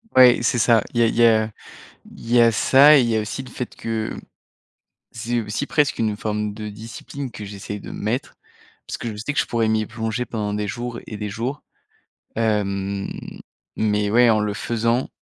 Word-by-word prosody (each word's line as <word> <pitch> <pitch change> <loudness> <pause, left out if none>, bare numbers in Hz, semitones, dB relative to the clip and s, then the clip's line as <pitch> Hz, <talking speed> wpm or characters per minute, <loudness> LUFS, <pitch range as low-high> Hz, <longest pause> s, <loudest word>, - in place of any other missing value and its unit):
Ouais, 125 -1 +8
c'est 120 +1 +2
ça, 115 -2 +4
il 120 - 0
y - - +6
a - - +4
il - - -2
y 120 - +5
a 110 -1 +3 0.7
il 115 - -10
y 120 0 +5
a 115 -1 +6
ça 140 +7 +7
et - - +6
il 120 - +1
y 115 - +1
a - - +2
aussi 110 +5 -4
le 130 - -12
fait 125 0 -6
que 110 -1 -3 1.0
c'est 120 +1 -2
aussi 105 -1 -3
presque 145 +2 +1
une 110 -2 0
forme 105 0 -2
de 105 0 -6
discipline 115 +5 -8
que 105 -1 -8
j'essaie 100 0 -7
de - - -10
me - - -7
mettre 115 +6 -2 0.5
parce - - -4
que 115 - -5
je 105 - -7
sais 110 +8 -3
que 145 - -3
je - - -1
pourrais 115 -2 0
m'y 110 0 +1
plonger 110 +2 -3
pendant 105 -2 -3
des 105 0 -2
jours 120 +3 -5
et 110 - -6
des 105 0 -4
jours, 120 +8 -4 0.7
hem, 100 -3 -1 0.7
mais 105 -1 +1
ouais, 120 +2 +5
en 110 -1 +3
le 105 -1 -1
faisant, 115 +3 0
110 Hz, 215 wpm, -22 LUFS, 105-120 Hz, 1.0 s, Ouais